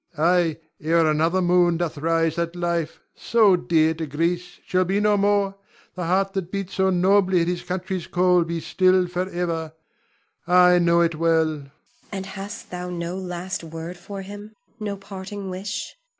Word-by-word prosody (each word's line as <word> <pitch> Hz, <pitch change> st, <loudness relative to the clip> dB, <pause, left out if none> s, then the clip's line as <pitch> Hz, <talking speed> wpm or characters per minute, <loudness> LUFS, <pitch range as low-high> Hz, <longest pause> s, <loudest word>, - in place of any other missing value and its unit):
Ion. 155 Hz, -, +1 dB
Ay, 175 Hz, -2 st, +3 dB, 0.2 s
ere 165 Hz, +2 st, +3 dB
another 165 Hz, +5 st, +1 dB
moon 175 Hz, -1 st, +3 dB
doth 165 Hz, -4 st, -3 dB
rise 165 Hz, 0 st, +1 dB
that 170 Hz, 0 st, -2 dB
life, 170 Hz, -2 st, -2 dB
so 215 Hz, -4 st, +4 dB
dear 160 Hz, -2 st, +2 dB
to 160 Hz, -1 st, -5 dB
Greece, 170 Hz, +5 st, -2 dB
shall 185 Hz, 0 st, +2 dB
be 190 Hz, +3 st, 0 dB
no 210 Hz, 0 st, +3 dB
more; 200 Hz, -1 st, +2 dB, 0.4 s
the 180 Hz, -2 st, -4 dB
heart 195 Hz, +3 st, +1 dB
that 185 Hz, -2 st, -3 dB
beat 195 Hz, -2 st, -4 dB
so 190 Hz, 0 st, +1 dB
nobly 190 Hz, 0 st, +3 dB
at 170 Hz, -, 0 dB
his 175 Hz, 0 st, -1 dB
country's 180 Hz, +1 st, -4 dB
call 180 Hz, -1 st, +3 dB
be 165 Hz, 0 st, -3 dB
still 185 Hz, +2 st, +3 dB
forever, 175 Hz, -3 st, -3 dB, 0.7 s
I 180 Hz, 0 st, +6 dB
know 170 Hz, 0 st, +4 dB
it 170 Hz, -1 st, +2 dB
well! 165 Hz, 0 st, +2 dB
Zuleika. 145 Hz, -3 st, -6 dB, 0.4 s
And 190 Hz, -1 st, -4 dB
hast 195 Hz, +3 st, -8 dB
thou 180 Hz, 0 st, -5 dB
no 170 Hz, 0 st, -4 dB
last 180 Hz, -1 st, -5 dB
word 165 Hz, +2 st, -7 dB
for 195 Hz, +2 st, -8 dB
him, 205 Hz, +2 st, -10 dB, 0.2 s
no 205 Hz, -2 st, -4 dB
parting 195 Hz, 0 st, -7 dB
wish? 195 Hz, +3 st, -5 dB
180 Hz, 170 wpm, -23 LUFS, 170-190 Hz, 0.7 s, I